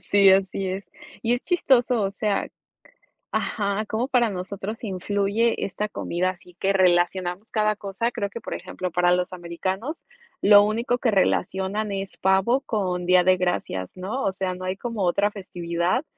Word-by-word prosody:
Sí, 200 -1 +5
así 190 0 +2
es. 190 +2 -4 0.4
Y 235 +1 +2
es 245 - -4
chistoso, 250 - +3
o 195 - 0
sea 200 0 -1 0.8
Ajá, 200 0 -1
cómo 225 +5 -2
para 240 -4 +3
nosotros 200 +4 -5
influye 205 +3 0
esta 210 +2 -3
comida, 180 -2 -1
así 180 -1 -13
que 195 - +2
relacionamos 180 +1 +1
cada 215 -1 +1
cosa. 200 +4 -2
Creo 205 -5 -3
que 235 - -7
por - - -5
ejemplo, 185 - -5
para 175 +1 +2
los 180 +1 0
americanos 185 - -4 0.4
lo 205 0 +8
único 230 +4 0
que 245 - +2
relacionan 195 +1 0
es 195 -1 -5
pavo 190 +7 +3
con 185 -7 -2
Día 180 0 +5
de 185 0 +5
Gracias, 175 - -2
¿no?, 205 +9 -3
o 195 - +1
sea 190 -1 -2
no 185 +1 -8
hay 185 +1 -2
como 230 -1 -4
otra 200 +3 +2
festividad 180 - -2
195 Hz, 165 wpm, -24 LUFS, 185-215 Hz, 0.8 s, lo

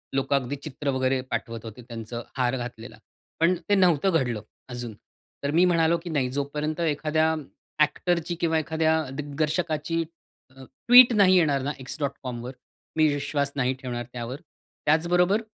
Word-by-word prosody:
लोकं 135 +1 +1
अगदी 135 0 -1
चित्र 145 -1 -4
वगैरे 130 0 +1
पाठवत 115 -2 -4
होते 115 +2 -9
त्यांचं 115 0 -7
हार 125 0 +1
घातलेला, 120 -2 -7 0.4
पण 170 +3 +4
ते 205 - +5
नव्हतं 185 -2 +3
घडलं 120 -5 -2 0.3
अजून. 120 -2 -5 0.5
तर 140 - 0
मी 170 +4 +4
म्हणालो, 170 -1 +3
की 170 +1 -8
"नाही 140 -5 0
जोपर्यंत 150 +3 -2
एखाद्या 155 0 +1 0.5
एक्टरची 170 +2 -1
किंवा 160 -1 +2
एखाद्या 160 +1 +1
दिग्दर्शकाची 155 +3 -1 0.5
अ, 135 - -12 0.2
ट्वीट 245 0 +9
नाही 195 -3 +5
येणार 145 -6 +3
ना, 140 +2 -2
x.comवर 130 -3 -5 0.5
मी 155 0 +5
विश्वास 145 0 -1
नाही 130 -2 +1
ठेवणार 120 -2 -4
त्यावर." 120 +1 -5 0.5
त्याचबरोबर 175 +6 +3
145 Hz, 145 wpm, -26 LUFS, 130-165 Hz, 0.5 s, ट्वीट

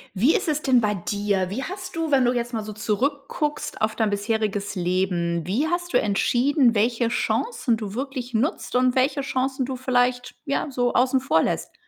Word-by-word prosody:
Wie 250 - +4
ist - - 0
es 300 -1 0
denn 260 -4 +4
bei 210 -2 +1
dir? 200 0 -1
Wie 235 +8 -3
hast 370 +1 -7
du 325 -2 -2
wenn 265 -2 +4
du 245 0 +2
jetzt 240 0 -3
mal 220 -2 -2
so 215 - -7
zurückguckst 280 +7 -2
auf 215 0 +1
dein 220 -2 +1
bisheriges 205 -1 -1
Leben, 175 -2 -1
wie 240 +12 +1
hast 350 +1 -2
du - - +4
entschieden, 240 +5 +2
welche 230 +2 +2
Chancen 245 - 0
du 210 -2 -6
wirklich 255 -2 -4
nutzt 255 +2 -1
und 250 0 +3
welche 270 +3 +2
Chancen 265 -1 -1
du 260 +1 -4
vielleicht, 250 -1 0
ja, 280 0 -1
so 245 -2 0
außen 260 +1 +3
vor 265 - +2
lässt? - - -2
245 Hz, 190 wpm, -24 LUFS, 210-275 Hz, -, Wie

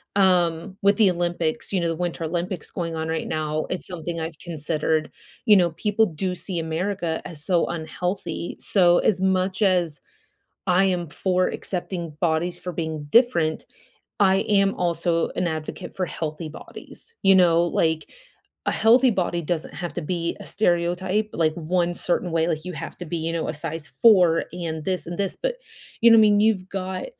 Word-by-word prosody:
Um, 180 -1 +2
with 200 0 +4
the 210 -4 +5
Olympics, 175 0 -2
you 185 - +1
know, 170 - 0
the 165 - -1
Winter 175 -1 -3
Olympics 175 +1 -3
going 165 -2 -3
on 160 0 -3
right 160 0 -2
now, 155 0 -2
it's 180 - -3
something 170 -1 -5
I've 160 -1 -6
considered. 155 -1 -1 0.3
You 210 -3 +7
know, 175 -3 +3
people 210 +6 +1
do 180 +2 -3
see 180 +1 -4
America 165 +1 -2
as 150 -3 -5
so 175 -3 +2
unhealthy, 170 +1 -4
so, 175 -3 +4
as 190 -3 +1
much 190 +1 +1
as 175 -7 +2 0.7
I 185 +2 +4
am 180 -2 0
for 185 +3 +1
accepting 175 -4 -4
bodies 175 +1 0
for 180 - -5
being 160 -3 -4
different, 225 -11 +3 0.5
I 190 -1 +5
am 195 -1 +3
also 170 -1 0
an 180 - 0
advocate 160 +3 -5
for 185 -2 -1
healthy 155 -1 -5
bodies, 460 - -10
you 195 0 +6
know? 170 -2 +5
Like, 160 -2 0 0.6
a - - +2
healthy 240 +4 +5
body 175 -4 -1
doesn't 165 0 -3
have 175 -1 -5
to - - -2
be 170 +1 -2
a - - -10
stereotype 185 +2 0
like 155 -2 +1
1 175 +1 0
certain 175 0 -1
way, 165 0 +1
like, 160 -1 -2
"You 180 - -5
have 160 +2 -7
to 180 - -6
be, 170 +2 -3
you 165 +1 -2
know, 165 -1 -2
a - - -3
size 160 0 -5
4 180 -7 +6
and 160 -3 -4
this 185 +1 -1
and 175 0 -6
this." 200 -2 -1
But, - - -1 0.4
you 235 - +7
know, 230 - +8
I - - +7
mean, 210 -1 +5
you've 205 -4 +2
got, 190 -1 -4
175 Hz, 185 wpm, -24 LUFS, 165-190 Hz, 0.7 s, know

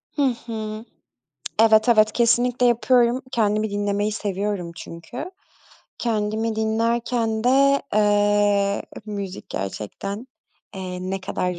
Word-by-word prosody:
Hı 290 - 0 0.2
hı. 220 -1 -5 0.8
Evet, 220 0 +5
evet, 215 -2 +5
kesinlikle 245 +1 +2
yapıyorum. 240 +1 +3
Kendimi 215 -1 +1
dinlemeyi 205 +1 -1
seviyorum 200 -4 -3
çünkü. 180 - -8 0.7
Kendimi 220 -1 -1
dinlerken 225 0 0
de, 275 +2 +4
eee, 205 -1 +3 0.2
müzik 200 -3 -6
gerçekten, 155 - -5 0.5
eee, 185 -1 -5
ne 195 0 -2
kadar 180 -2 -3
215 Hz, 100 wpm, -23 LUFS, 200-235 Hz, 0.8 s, Evet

